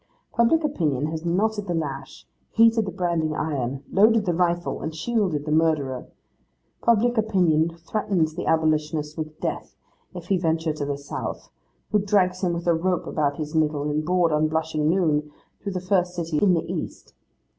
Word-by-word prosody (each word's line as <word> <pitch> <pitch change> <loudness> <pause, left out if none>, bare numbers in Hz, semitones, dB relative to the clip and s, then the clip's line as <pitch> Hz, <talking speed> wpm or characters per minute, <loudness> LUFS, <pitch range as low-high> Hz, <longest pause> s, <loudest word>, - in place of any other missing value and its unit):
Public 275 +8 +3
opinion 155 - 0
has 160 0 -4
knotted 205 +4 0
the 175 - -1
lash, 135 -4 -5 0.2
heated 225 -1 +4
the - - -3
branding 170 -4 -1
iron, 140 -3 -2
loaded 215 +2 +4
the 175 - +1
rifle, 175 0 0
and 160 0 -4
shielded 180 -5 -1
the 150 - -3
murderer. 150 -5 +1 0.7
Public 235 +1 +3
opinion 170 -6 +2
threatens 170 -2 -1
the 175 - -5
abolitionist 155 -1 +1
with 155 -1 -6
death, - - -4 0.4
if 175 -1 -8
he 190 -2 +2
venture 160 -2 0
to 150 -1 -4
the 140 -1 -2
South; 140 - -6 0.4
and 205 -1 +2
drags 185 -3 +2
him 175 -2 +1
with 170 0 -4
a 170 - +4
rope 180 +2 0
about 145 -2 -1
his 150 0 -5
middle, 150 -2 +1
in 150 +1 0
broad 175 +1 +2
unblushing 155 0 +1
noon, 155 -4 +1 0.3
through 200 - -4
the 185 - -2
first 180 -1 0
city 165 -3 -1
in 190 -3 +4
the 165 - -1
East. - - -6
165 Hz, 170 wpm, -24 LUFS, 155-185 Hz, 0.7 s, heated